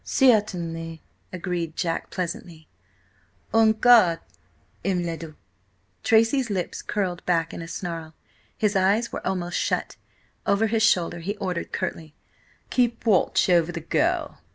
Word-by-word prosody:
"Certainly," 170 - +1 0.3
agreed 175 -3 -3
Jack 165 -3 -2
pleasantly. 170 -3 -5 0.9
"On 225 -1 +6
guard, 220 -7 +6 0.7
M. 185 -2 0
le 170 -1 -2
Duc!" 160 -1 -9 0.7
Tracy's 230 +3 +3
lips 185 -4 -3
curled 185 -4 -2
back 165 -2 +1
in - - -6
a 165 - -7
snarl. 165 -2 -6 0.4
His 210 -1 +1
eyes 200 +5 +2
were - - -4
almost 180 -2 -1
shut. - - -1 0.5
Over 200 +2 +3
his 225 0 +1
shoulder 175 -6 +2
he 200 +5 -4
ordered 180 -4 -3
curtly: 155 -2 -4 0.6
"Keep 240 -2 +1
watch 205 -6 +3
over 175 -2 +3
the 170 - -5
girl. 320 - 0
180 Hz, 130 wpm, -25 LUFS, 165-220 Hz, 0.9 s, On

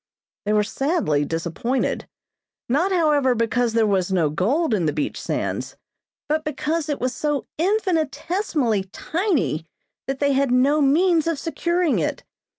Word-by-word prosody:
They 210 - +1
were 210 0 +3
sadly 245 - 0
disappointed. 170 - -2 0.6
Not, 310 +10 +1
however, 295 -7 +3
because 230 +1 +1
there 225 -1 +3
was 195 -3 +1
no 165 -6 +2
gold 245 - +1
in 180 -6 +1
the 150 - 0
beach 150 -1 -3
sands, - - -3 0.5
but 310 +1 0
because 305 +2 -2
it 290 - -1
was 255 +1 -1
so 295 -2 -1
infinitesimally 330 - 0
tiny 295 - -1 0.4
that 270 0 -2
they 285 -1 +2
had 275 0 +2
no 270 +5 +3
means 325 +4 +3
of 330 -2 0
securing 335 +2 0
it. - - -2
275 Hz, 145 wpm, -22 LUFS, 215-325 Hz, 0.6 s, were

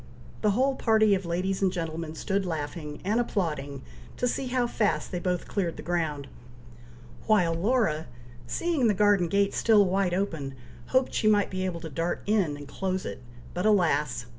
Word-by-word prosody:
The 210 - +3
whole 270 +2 +3
party 220 -4 +3
of 190 -2 -1
ladies 185 +3 -1
and 190 -2 +3
gentlemen 165 -2 -4
stood 195 +4 -1
laughing, 150 -3 -5
and 215 +4 +2
applauding, 150 - -2 0.3
to 250 - +1
see 260 +2 -2
how 250 -1 +1
fast 225 -3 0
they 180 - -2
both 180 0 -2
cleared 175 -5 -2
the - - -7
ground, 160 -5 -2 1.0
while 180 -7 +4
Laura, 170 -4 +1 0.4
seeing 315 - +1
the 210 - +2
garden 205 -3 +4
gate 200 +3 +1
still 215 -3 +4
wide 185 -1 +1
open, 160 -8 -2 0.3
hoped 260 0 +1
she 215 - +1
might 205 -1 +3
be 185 0 -2
able 170 -3 -3
to 165 - -6
dart 165 +5 -2
in, 195 -9 +1
and 145 -1 -10
close 185 +5 -3
it, - - -6 0.3
but 180 - -2
alas! 160 - +2
185 Hz, 175 wpm, -27 LUFS, 165-210 Hz, 1.0 s, while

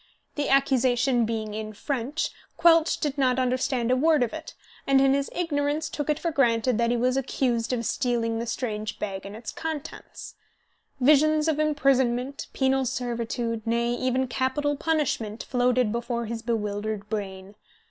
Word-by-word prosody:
The 290 -1 -2
accusation 260 -2 +3
being 220 -1 -3
in 215 0 -5
French, 275 +6 -2 0.3
Quelch 330 -1 +4
did 295 -2 -2
not 255 -2 +3
understand 255 -1 0
a - - +4
word 305 0 +3
of 235 - -3
it, - - -8 0.3
and 275 -1 +5
in 270 0 +4
his 280 0 0
ignorance 300 -2 -1
took 295 0 -4
it 300 - +2
for 335 - -2
granted 240 -4 +2
that 235 0 +2
he 240 - +1
was 250 +2 +1
accused 245 -3 0
of 235 -2 -1
stealing 230 -2 0
the 235 - -4
strange 215 -3 -3
bag 195 -1 -5
and 200 - -9
its 225 0 -7
contents. 320 -1 -7 0.7
Visions 305 +3 +4
of 310 -2 +1
imprisonment, 275 -3 +1
penal 265 0 +1
servitude, 235 -1 -2
nay, 235 +1 +1
even 255 +1 0
capital 270 +4 0
punishment, 280 -8 -1
floated 250 -2 +1
before 235 0 -2
his 225 0 -4
bewildered 210 -2 -2
brain. 195 -2 -5
250 Hz, 160 wpm, -26 LUFS, 230-280 Hz, 0.7 s, and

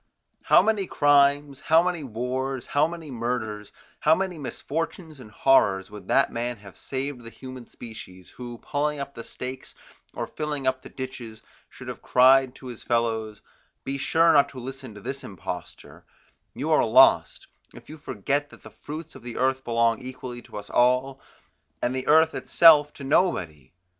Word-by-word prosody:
How - - +6
many 210 -4 0
crimes, 145 -1 +3
how 160 +3 +4
many 175 -3 -2
wars, 130 +2 -3
how 145 +2 +2
many 165 -3 -8
murders, 115 -4 -4 0.3
how - - +4
many 185 -3 -3
misfortunes 160 +2 -5
and 120 -4 -12
horrors, 100 -5 +2
would 105 -1 -11
that - - +3
man 120 +1 -3
have 100 -1 -14
saved 135 -1 -5
the 115 - -10
human 130 0 -10
species, 110 -6 -11
who 120 -1 -8
pulling 150 +1 -1
up 140 0 -6
the 115 - -8
stakes 130 +2 -8 0.4
or - - -3
filling 150 -3 -4
up 130 0 0
the - - -12
ditches 125 -4 -8 0.3
should - - -12
have - - -7
cried 130 0 +4
to - - -14
his 120 -3 -8
fellows: 110 -2 -1 0.4
Be 140 +1 -4
sure 165 +4 +3
not 145 -1 +5
to 130 - -10
listen 130 -2 -8
to 105 - -11
this 135 +6 -6
imposter; 95 -5 -8 0.5
you - - -3
are - - +4
lost, - - +4 0.3
if - - -14
you 155 0 -11
forget 145 +3 -2
that - - -17
the - - -12
fruits 155 +2 -9
of 130 - -12
the 120 0 -8
earth 130 +1 +1
belong 115 0 +1
equally 125 -1 -8
to - - -11
us 105 0 -9
all, 125 +2 +2 0.6
and 120 +7 -1
the 130 - -4
earth 160 +1 +5
itself 150 -3 +5
to 140 - -11
nobody! 90 - 0
130 Hz, 175 wpm, -25 LUFS, 115-145 Hz, 0.6 s, How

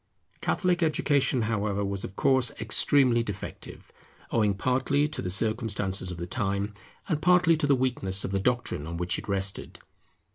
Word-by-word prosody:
Catholic 180 -2 0
education, 140 -5 +2
however, 105 -2 -1
was 100 0 -3
of 95 - -7
course, 130 -2 +2
extremely 120 +2 +3
defective; 105 -4 -8 0.4
owing 105 -3 +2
partly 130 +6 +1
to 155 - -5
the 90 - -4
circumstances 100 -2 0
of 90 - -5
the 85 - -5
time, 100 +3 -2 0.3
and 155 -5 -1
partly 180 -1 +4
to 150 - 0
the 140 - +4
weakness 110 -7 0
of - - -4
the 100 - 0
doctrine 120 -9 -1
on 85 +1 -5
which 90 0 0
it - - -11
rested. 95 -1 0
110 Hz, 160 wpm, -27 LUFS, 95-135 Hz, 0.4 s, partly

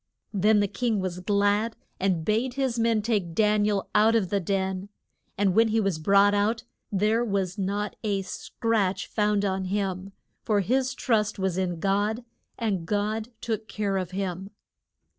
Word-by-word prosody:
Then 210 +1 +4
the 205 - +2
king 230 0 -1
was 185 -1 -3
glad, 205 +3 +1 0.2
and 185 -4 0
bade 235 +4 0
his 260 -4 0
men 225 -2 +2
take 200 -7 -1
Dan 210 0 +3
i - - +2
el 200 -2 -1
out 220 +2 +5
of 200 -6 +1
the 200 - +2
den. 190 +1 -2 0.5
And 195 -2 +2
when 225 +3 +5
he 220 +1 +1
was 195 -6 0
brought 200 +4 +4
out, 215 +3 +1 0.3
there 210 +4 +2
was 195 -3 -1
not 200 +2 -2
a 200 -3 0
scratch 200 0 -1
found 210 -1 +1
on 190 -1 -1
him, 195 0 -2 0.3
for 210 -3 +1
his 260 +6 0
trust 220 -3 +1
was 190 -2 -1
in 180 -2 -1
God, 205 +5 0 0.3
and 195 -7 -2
God 215 +2 -1
took 220 -1 -3
care 200 -2 -1
of 185 -2 -2
him. 190 0 -4
205 Hz, 170 wpm, -26 LUFS, 190-220 Hz, 0.5 s, out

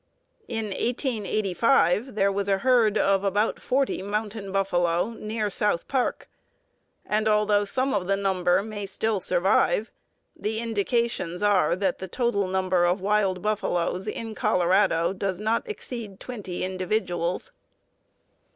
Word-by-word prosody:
In 225 -2 -3
1885 215 - +1
there 200 -1 +2
was 200 0 -2
a 195 - +3
herd 230 -2 +3
of 195 -1 +2
about 205 +2 0
forty 270 -5 0
"mountain 205 0 -4
buffalo" 180 0 +1
near 215 -1 -3
South 200 -4 0
Park, 260 -3 -1 0.8
and 215 +1 0
although 210 -1 +3
some 260 +6 0
of 190 -3 -1
the 195 - +2
number 185 -2 +1
may 205 -2 -6
still 215 +1 -1
survive, 190 +4 +2 0.4
the 220 +1 -3
indications 225 -4 -1
are 205 -4 +3
that 190 -1 -1
the 190 - -5
total 205 -2 0
number 185 -1 +1
of 175 +3 +2
wild 195 -2 +1
buffaloes 190 -3 0
in 225 +1 -4
Colorado 185 -3 +2
does 190 -1 -3
not 220 - -1
exceed 230 - -6
twenty 205 -8 -6
individuals. 185 - -2
200 Hz, 130 wpm, -25 LUFS, 185-220 Hz, 0.8 s, a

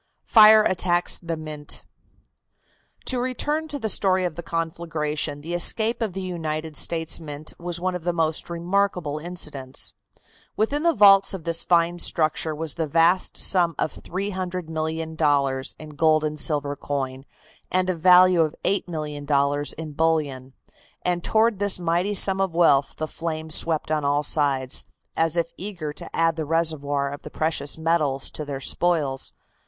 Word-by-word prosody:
FIRE 215 -1 +7
ATTACKS 175 -2 +1
THE 170 -2 -4
MINT. 155 -1 -6 1.2
To 255 - +2
return 295 +5 -2
to 295 -2 -4
the 225 - -3
story 190 -2 +2
of 175 - -2
the 170 - -7
conflagration, 160 -3 -3
the 165 +3 -6
escape 220 +7 +1
of 215 -5 -2
the 190 +1 -5
United 160 -3 -4
States 165 +3 +2
Mint 150 -1 -6
was 175 0 -3
one 185 +1 -1
of 180 -2 -5
the 175 - 0
most 160 -2 -1
remarkable 175 -3 -1
incidents. 150 -6 -3 0.6
Within 280 +8 0
the 335 -1 +2
vaults 195 -1 +6
of 180 - -8
this 165 0 +2
fine 175 0 +2
structure 155 -1 0
was 155 -1 +1
the 160 -2 -2
vast 170 +5 +2
sum 175 -3 +3
of - - -2
$300,000,000 160 -7 -2
in 155 - -10
gold 155 +1 +2
and 150 0 -3
silver 145 -2 0
coin 135 -2 -4 0.5
and 185 0 +1
a 185 - +1
value 180 +1 +6
of 155 -2 0
$8,000,000 145 -5 -1
in 160 -1 -7
bullion, 145 -4 -1 0.5
and 175 -1 -1
toward 220 -2 +2
this 205 -1 +1
mighty 175 +4 -1
sum 195 0 +5
of 190 -4 -1
wealth 145 -5 +3
the 155 - -3
flames 160 -1 -5
swept 160 -1 0
on 155 -1 0
all 145 +1 +1
sides, 140 -3 +1 0.3
as 165 +1 +1
if 170 0 0
eager 175 -7 -6
to - - -8
add 165 0 +1
the 160 - -2
reservoir 145 -3 0
of 145 - -9
the - - -9
precious 155 -2 -1
metals 160 -4 0
to 155 - -6
their 140 -2 -5
spoils. 145 -2 0
165 Hz, 160 wpm, -23 LUFS, 150-180 Hz, 1.2 s, FIRE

